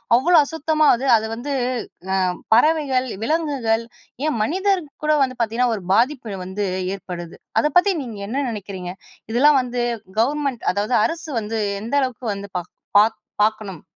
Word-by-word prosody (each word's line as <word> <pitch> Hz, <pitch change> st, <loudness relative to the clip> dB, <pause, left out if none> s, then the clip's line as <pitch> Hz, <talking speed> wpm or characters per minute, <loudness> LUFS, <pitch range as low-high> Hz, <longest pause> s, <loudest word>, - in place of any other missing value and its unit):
அவ்ளோ 335 Hz, +9 st, +4 dB
அசுத்தமா 315 Hz, 0 st, 0 dB
அது 255 Hz, +3 st, -4 dB
அது 220 Hz, 0 st, -3 dB
வந்து 270 Hz, +5 st, -4 dB, 0.6 s
அ -, -, +2 dB, 0.4 s
பறவைகள், 270 Hz, 0 st, +3 dB, 0.2 s
விலங்குகள் 265 Hz, -6 st, 0 dB, 0.4 s
ஏன் 300 Hz, -, 0 dB
மனிதர்க்கு 370 Hz, -, 0 dB
கூட 305 Hz, 0 st, +4 dB
வந்து 255 Hz, -2 st, -2 dB
பார்த்தீங்கன்னா, 235 Hz, +2 st, +1 dB
ஒரு 200 Hz, -, -7 dB
பாதிப்பு 235 Hz, -3 st, +1 dB
வந்து 195 Hz, +2 st, -3 dB, 0.3 s
ஏற்படுது. 175 Hz, -3 st, -8 dB, 0.2 s
அத 300 Hz, -, +2 dB
பத்தி 390 Hz, +2 st, +4 dB
நீங்க 230 Hz, -6 st, -7 dB
என்ன 275 Hz, +5 st, -1 dB
நினைக்கிறீங்க? 190 Hz, -4 st, -6 dB, 0.4 s
இதெல்லாம் 275 Hz, +4 st, +5 dB
வந்து 245 Hz, -1 st, -2 dB, 0.4 s
கவர்மெண்ட் 275 Hz, 0 st, 0 dB
அதாவது 210 Hz, +5 st, 0 dB
அரசு 330 Hz, -1 st, -4 dB
வந்து 220 Hz, +1 st, -3 dB, 0.2 s
எந்த 230 Hz, +6 st, -3 dB
அளவுக்கு 255 Hz, -2 st, -3 dB
வந்து 200 Hz, 0 st, -7 dB
பாக் 175 Hz, -1 st, -7 dB, 0.3 s
பாக் 220 Hz, +2 st, +3 dB, 0.2 s
பாக்கணும்? 215 Hz, -5 st, -1 dB
245 Hz, 145 wpm, -21 LUFS, 215-295 Hz, 0.6 s, இதெல்லாம்